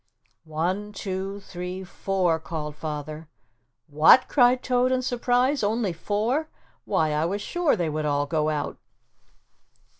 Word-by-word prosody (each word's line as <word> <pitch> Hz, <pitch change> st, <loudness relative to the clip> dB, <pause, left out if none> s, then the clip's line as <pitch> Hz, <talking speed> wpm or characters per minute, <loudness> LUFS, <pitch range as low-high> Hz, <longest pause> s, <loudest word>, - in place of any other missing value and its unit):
"One, 180 Hz, +7 st, -2 dB
two, 195 Hz, 0 st, -4 dB
three, 185 Hz, 0 st, -6 dB
four," 185 Hz, -2 st, 0 dB
called 155 Hz, -2 st, -5 dB
Father. 155 Hz, 0 st, -6 dB, 0.6 s
"What," 155 Hz, -, +6 dB
cried 250 Hz, -2 st, +4 dB
Toad 250 Hz, 0 st, +2 dB
in 255 Hz, 0 st, +1 dB
surprise, 250 Hz, +2 st, +1 dB
"only 210 Hz, -2 st, 0 dB
four 220 Hz, -, -1 dB, 0.4 s
why, 155 Hz, -1 st, +1 dB
I 150 Hz, +2 st, +1 dB
was 200 Hz, +4 st, -2 dB
sure 350 Hz, -3 st, +1 dB
they 175 Hz, -5 st, -1 dB
would 155 Hz, 0 st, -2 dB
all 145 Hz, -1 st, +1 dB
go 155 Hz, 0 st, 0 dB
out." 150 Hz, -2 st, -3 dB
185 Hz, 130 wpm, -25 LUFS, 155-240 Hz, 0.6 s, What